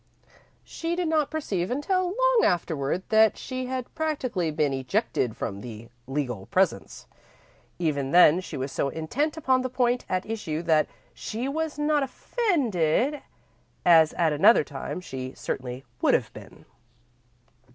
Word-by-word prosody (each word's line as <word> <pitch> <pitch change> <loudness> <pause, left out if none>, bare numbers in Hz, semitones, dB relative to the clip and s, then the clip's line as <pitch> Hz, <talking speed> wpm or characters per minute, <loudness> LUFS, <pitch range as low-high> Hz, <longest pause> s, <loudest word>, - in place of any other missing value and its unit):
She 335 +1 -4
did 355 -1 -1
not 305 -3 +1
perceive 195 - -2
until 370 +8 0
long - - +3
afterward 165 -1 0
that 220 0 +5
she 255 -1 -5
had 255 -1 -4
practically 255 - -1
been 150 -2 0
ejected 130 - -1
from 100 0 -4
the 115 0 -9 0.2
legal 125 -8 -3
presence. - - 0 0.7
Even 145 -5 -1
then, 175 +1 +6
she - - -7
was 135 +1 -3
so 140 - -1
intent 270 - -2
upon 260 -4 +2
the 255 - -2
point 245 -1 0
at 185 0 -1
issue 175 -8 -4
that 160 -2 +3 0.3
she 230 +4 -4
was 315 +2 -2
not 295 0 +2
offended, 275 - 0 0.6
as 165 -3 +6
at 165 -3 +1
another 155 +6 +6
time 145 +5 -6
she 130 -6 -6
certainly 125 0 -5 0.2
would - - +4
have - - -2
been. - - -13
185 Hz, 140 wpm, -26 LUFS, -, 0.7 s, then